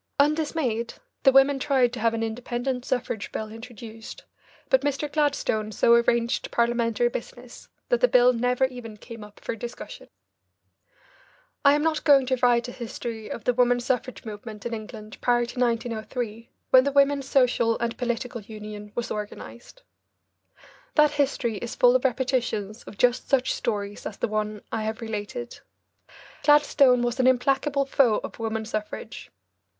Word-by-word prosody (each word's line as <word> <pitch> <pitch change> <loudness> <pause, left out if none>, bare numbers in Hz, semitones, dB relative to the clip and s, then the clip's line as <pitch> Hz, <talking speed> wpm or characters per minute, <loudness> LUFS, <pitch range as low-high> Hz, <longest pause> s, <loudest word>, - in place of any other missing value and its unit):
Undismayed, 290 -6 0 0.3
the 270 - +6
women 270 +1 +5
tried 265 -4 +2
to - - -5
have 230 +1 +1
an 225 - -2
independent 245 +3 -3
suffrage 230 -5 -3
bill 215 0 -5
introduced, 225 -1 -10 0.4
but 265 - +4
Mr. 290 +1 -1
Gladstone 285 -8 0
so 235 - +4
arranged 235 +1 +2
Parliamentary 235 0 +1
business 240 +1 -8 0.2
that - - +2
the - - +6
bill 250 - +5
never 250 +2 +1
even 245 -4 -8
came 230 0 -10
up 210 0 -14
for - - -4
discussion. 235 +2 -8 1.6
I 280 0 +6
am 295 - 0
not 320 -1 0
going 275 -3 +6
to 260 0 0
write 240 -1 +3
a - - -6
history 230 -2 -6
of 225 - -6
the 250 - +2
woman 245 0 +3
suffrage 250 +1 -3
movement 210 -1 -8
in 235 - -3
England 215 -1 -8
prior 240 -1 +2
to 245 +2 -8
1903, 230 -1 -2 0.2
when 260 0 +8
the 280 - 0
Women's 280 -1 +3
Social 245 -3 +3
and 235 0 -2
Political 240 -1 -3
Union 210 0 -9
was 240 0 -3
organised. 235 - -8 1.1
That 300 -1 +5
history 270 -6 0
is 235 +3 -6
full 245 0 +5
of 255 - +1
repetitions 245 -4 -1
of 200 - -11
just 245 0 +2
such 265 -2 +2
stories 205 -2 -3
as 200 - -8
the - - -1
one 215 -1 -3
I 220 - -2
have 220 0 -3
related. 230 +2 -5 0.8
Gladstone 280 -4 +5
was 240 +2 -2
an 255 - +4
implacable 275 +2 +2
foe 255 -5 +3
of - - -8
woman 220 -1 -2
suffrage. 215 -1 -6
240 Hz, 155 wpm, -25 LUFS, 225-260 Hz, 1.6 s, when